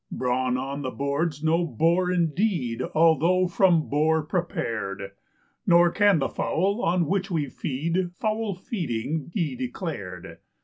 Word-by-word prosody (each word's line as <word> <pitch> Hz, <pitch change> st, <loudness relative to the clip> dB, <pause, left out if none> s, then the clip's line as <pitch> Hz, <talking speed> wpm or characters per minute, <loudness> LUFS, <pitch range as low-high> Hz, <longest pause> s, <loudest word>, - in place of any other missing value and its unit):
Brawn 125 Hz, 0 st, 0 dB
on 135 Hz, +2 st, -4 dB
the 130 Hz, -, -3 dB
board's 140 Hz, +3 st, -2 dB
no 165 Hz, +2 st, +2 dB
bore 170 Hz, +6 st, +1 dB
indeed 170 Hz, -, 0 dB
although 165 Hz, +3 st, +4 dB
from 175 Hz, -3 st, +3 dB
boar 155 Hz, +2 st, +2 dB
prepared; 110 Hz, -, -3 dB, 0.6 s
Nor 170 Hz, 0 st, +6 dB
can 205 Hz, -2 st, +4 dB
the 135 Hz, -, 0 dB
fowl, 200 Hz, +6 st, -1 dB
on 175 Hz, 0 st, +2 dB
which 195 Hz, +4 st, -1 dB
we 160 Hz, -5 st, 0 dB
feed, 165 Hz, +9 st, -2 dB
foul 215 Hz, 0 st, -1 dB
feeding 160 Hz, -, -3 dB
he 165 Hz, -8 st, -1 dB
declared. 125 Hz, 0 st, -6 dB
160 Hz, 130 wpm, -25 LUFS, 135-180 Hz, 0.6 s, Nor